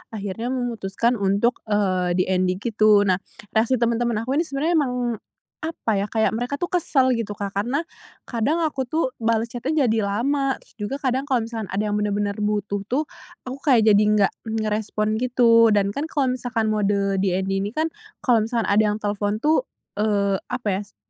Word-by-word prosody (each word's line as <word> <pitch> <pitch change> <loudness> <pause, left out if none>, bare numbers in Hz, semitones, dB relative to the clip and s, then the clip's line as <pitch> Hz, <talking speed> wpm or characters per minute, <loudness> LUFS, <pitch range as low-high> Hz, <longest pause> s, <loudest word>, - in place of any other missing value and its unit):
akhirnya 205 +3 -4
memutuskan 235 -2 -1
untuk, 200 +5 +1
eee, 185 -4 +1
DND 185 0 +1
gitu. 215 -3 +4
Nah, 185 -2 +2 0.3
reaksi 225 +4 +2
teman-teman 235 -1 0
aku 265 +5 0
ini 330 - 0
sebenarnya 285 +4 -1
emang 265 -4 0 0.7
apa 315 -7 -3
ya, 200 - -1
kayak 220 0 +1
mereka 245 +5 -2
tuh 350 +6 -4
kesel, 275 -7 +2
gitu, 230 -4 -2
Kak, 200 -1 -4
karena 240 +10 -1 0.4
kadang 280 +8 0
aku 275 -5 -1
tuh 310 -1 0
bales 230 0 0
chat-nya 280 +5 0
jadi 220 -2 +1
lama, 270 +6 0
terus - - -21
juga 210 +6 -3
kadang 265 +1 0
kalau 255 -5 +1
misalkan 225 -2 -5
ada 195 +3 -2
yang 210 0 0
bener-bener 205 0 0
butuh 210 -1 -1
tuh, 270 +7 0 0.4
aku 260 +2 -7
kayak 225 -5 +5
jadi 205 +1 +5
enggak 210 -2 +3 0.2
ngerespon, 215 0 -1
gitu, 235 -2 +5
dan 200 -1 +2
kan 285 +8 -3
kalau 280 -5 0
misalkan 240 -3 -1
mode 200 -2 +1
DND 190 0 0
ini 205 +3 -4
kan 320 +1 0 0.3
kalau 245 -3 +4
misalkan 230 -3 -1
ada 210 +2 +4
yang 210 - 0
telepon 205 0 -1
tuh, 315 +11 +2 0.3
eee, 200 -2 +1
apa 245 -3 -4
ya, - - -4
s - - -26
225 Hz, 180 wpm, -23 LUFS, 205-255 Hz, 0.7 s, kayak